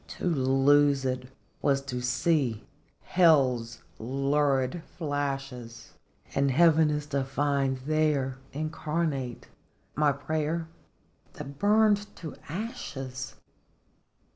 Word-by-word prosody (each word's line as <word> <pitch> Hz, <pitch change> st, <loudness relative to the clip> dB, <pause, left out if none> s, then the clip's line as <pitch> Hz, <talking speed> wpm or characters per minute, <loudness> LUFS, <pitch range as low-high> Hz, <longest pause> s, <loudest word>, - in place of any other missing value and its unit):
To -, -, -5 dB
lose 140 Hz, -2 st, +3 dB
it 125 Hz, 0 st, -2 dB, 0.3 s
was 140 Hz, -1 st, +2 dB
to 125 Hz, -3 st, -4 dB
see 130 Hz, -2 st, +1 dB, 0.4 s
Hell's 130 Hz, -10 st, +3 dB, 0.2 s
lurid 135 Hz, +4 st, +1 dB, 0.2 s
flashes, 135 Hz, -6 st, -4 dB, 0.4 s
And 140 Hz, 0 st, +2 dB
Heaven 160 Hz, +2 st, +5 dB
is 150 Hz, 0 st, -1 dB
to 140 Hz, -1 st, +2 dB
find 135 Hz, 0 st, 0 dB
there, 145 Hz, -4 st, +1 dB
incarnate, 150 Hz, -3 st, -3 dB, 0.5 s
My 150 Hz, 0 st, +3 dB
prayer 155 Hz, +3 st, -2 dB, 0.7 s
that 140 Hz, +1 st, -8 dB
burned 210 Hz, 0 st, +4 dB
to 160 Hz, -4 st, -8 dB
ashes 135 Hz, -, -5 dB
140 Hz, 90 wpm, -28 LUFS, 130-155 Hz, 0.7 s, Heaven